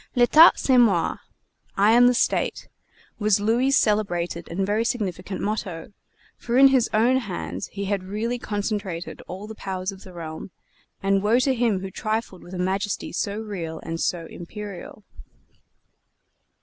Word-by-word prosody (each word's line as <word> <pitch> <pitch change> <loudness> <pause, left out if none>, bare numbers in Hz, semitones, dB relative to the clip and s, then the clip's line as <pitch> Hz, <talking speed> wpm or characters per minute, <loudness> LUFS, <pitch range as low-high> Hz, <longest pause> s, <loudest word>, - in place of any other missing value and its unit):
"L'Etat 280 +7 +7
c'est 260 -2 +3
moi" 200 -8 +3 0.6
"I 205 +2 +5
am 245 +2 +6
the 250 - +3
State," - - 0 0.5
was 210 -2 +3
Louis' 230 +6 +2
celebrated 180 - 0
and 190 +3 -1
very 210 +3 +1
significant 195 -5 -3
motto; 200 -4 -4 0.4
for 240 +1 -1
in 270 +1 +8
his 260 -3 +2
own 235 +4 +3
hands 90 - -4
he 200 0 -5
had 195 -1 -1
really 225 +5 -3
concentrated 205 -5 -4
all 190 +3 -7
the 220 - -8
powers 190 -2 -4
of 190 -1 -12
the 185 - -12
realm, 165 0 -7 0.5
and 195 0 +2
woe 215 +4 +3
to 260 +1 +2
him 230 -6 +1
who 190 0 -6
trifled 215 -2 -3
with 180 +2 -10
a - - -4
majesty 195 +3 -2
so 200 0 -2
real 180 -7 -5
and 165 0 -4
so 170 -2 -1
imperial! 200 +3 -9
205 Hz, 155 wpm, -24 LUFS, 185-225 Hz, 0.6 s, in